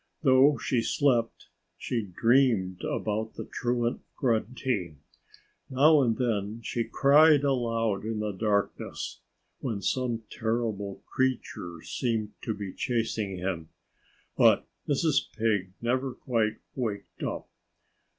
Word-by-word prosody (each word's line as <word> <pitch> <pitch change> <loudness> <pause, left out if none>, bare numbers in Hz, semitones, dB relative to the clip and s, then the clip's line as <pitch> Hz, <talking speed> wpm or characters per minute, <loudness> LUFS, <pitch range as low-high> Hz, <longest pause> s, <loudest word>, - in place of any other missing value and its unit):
Though 135 +1 +6
she 125 -3 0
slept, 120 -1 +1 0.3
she 120 - -2
dreamed 105 -2 +2
about 110 +1 -2
the - - -6
truant 120 0 -1
Grunty. 115 - -1 0.7
Now 145 +3 +5
and 115 -4 +1
then 110 -3 -1
she 115 0 -2
cried 145 +2 +5
aloud 115 -6 0
in 110 0 -3
the 105 -1 -1
darkness, 100 0 -2 0.4
when 115 -6 -3
some 120 -3 -1
terrible 110 -3 -2
creature 115 -10 -2
seemed 110 -4 -2
to 110 - -2
be 100 -2 -6
chasing 110 -5 -1
him. 90 -3 -3 0.7
But - - +5 0.2
Mrs. 145 0 +1
Pig 105 -5 +1
never 130 +2 0
quite 110 -4 0 0.2
waked 110 -6 -4
up. - - -3
115 Hz, 110 wpm, -28 LUFS, 105-130 Hz, 0.7 s, Though